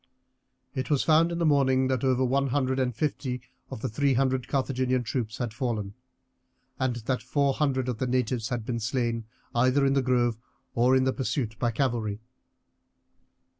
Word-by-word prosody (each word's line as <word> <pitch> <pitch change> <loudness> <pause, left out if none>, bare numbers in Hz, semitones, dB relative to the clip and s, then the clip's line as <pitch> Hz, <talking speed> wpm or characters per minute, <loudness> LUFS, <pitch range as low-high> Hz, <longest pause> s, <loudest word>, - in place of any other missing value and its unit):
It 130 -1 -3
was 145 -3 +2
found 165 +2 +4
in 170 - -2
the 170 - +1
morning 130 -3 +3
that 130 -1 0
over 130 -1 +2
one 135 +2 +1
hundred 130 0 0
and 125 -3 0
fifty 130 -2 -2 0.3
of - - -7
the 130 - -1
three 135 +3 +1
hundred 130 -1 +1
Carthaginian 130 -2 0
troops 115 -2 -3
had 120 -4 -3
fallen, 110 -5 -2 0.9
and 130 -2 0
that 120 +2 -2
four 140 -2 +1
hundred 130 -3 0
of 120 -3 -3
the 130 - 0
natives 125 -2 0
had 120 -3 -3
been 115 -1 -2
slain 115 -1 -1 0.3
either 130 +3 +3
in 135 - +3
the 135 - +3
grove 120 -3 +1 0.3
or 125 +2 +4
in 130 - +4
the 130 0 +1
pursuit 125 -4 -2
by 120 - +1
cavalry. 115 -4 -1
130 Hz, 175 wpm, -27 LUFS, 120-135 Hz, 0.9 s, found